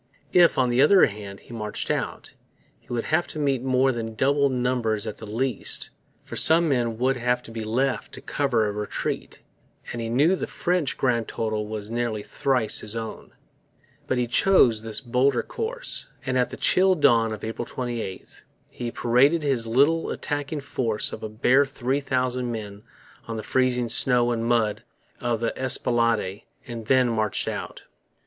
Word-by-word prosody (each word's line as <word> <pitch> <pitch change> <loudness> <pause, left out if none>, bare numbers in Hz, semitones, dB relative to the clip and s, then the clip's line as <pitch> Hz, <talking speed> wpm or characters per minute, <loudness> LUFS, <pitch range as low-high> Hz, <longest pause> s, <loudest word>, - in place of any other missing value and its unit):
If, 175 -1 +5
on 130 -2 +3
the 120 +2 +3
other 185 +7 +7
hand, 100 -2 -7
he - - -13
marched 105 -2 -3
out, - - -4 0.5
he - - -32
would 120 -1 -1
have 165 +3 +1
to - - -8
meet 140 -4 +1
more 130 0 +2
than 115 -2 -5
double 140 +3 +2
numbers 125 -4 0
at 110 - -5
the 110 - -9
least; 125 +5 -1 0.3
for - - -8
some 165 +1 +4
men 120 -5 0
would 130 +2 +1
have 125 0 0
to - - -11
be 115 -1 -5
left 125 +5 -1
to - - -8
cover 125 -6 0
a 105 - -1
retreat; 105 0 -4 0.5
and 120 - -4
he 115 - -3
knew 145 +10 +3
the - - -4
French 175 -5 -1
grand 120 -4 +1
total 110 -1 -2
was 105 0 -6
nearly 115 -3 -2
thrice 125 -4 0
his 105 +1 -6
own. 115 -1 -6 0.7
But 130 - 0
he 125 - +1
chose 120 - +4
this 110 -1 -1
bolder 125 +1 +1
course; - - -5 0.2
and 130 -1 -1
at 125 -1 +2
the - - -8
chill 190 0 +4
dawn 120 -8 +4
of 110 - -6
April 115 +2 -4
28, 120 -7 -6 0.3
he 120 -1 -5
paraded 135 +8 +3
his 130 -5 0
little 145 +8 +3
attacking 145 0 -3
force 115 -6 -2
of - - -6
a 110 - -5
bare 125 +6 +3
three 135 0 -1
thousand 125 -2 -1
men 105 -3 -6 0.5
on 115 - -4
the 110 - -5
freezing 125 -2 +1
snow 120 +1 +2
and 115 -1 -1
mud 115 -3 +1 0.4
of 120 -2 -1
the 115 - -1
Esplanade 115 -5 +1 0.2
and 115 -3 -7
then 130 -1 +4
marched 110 -3 -1
out. - - -5
120 Hz, 175 wpm, -25 LUFS, 115-135 Hz, 0.7 s, other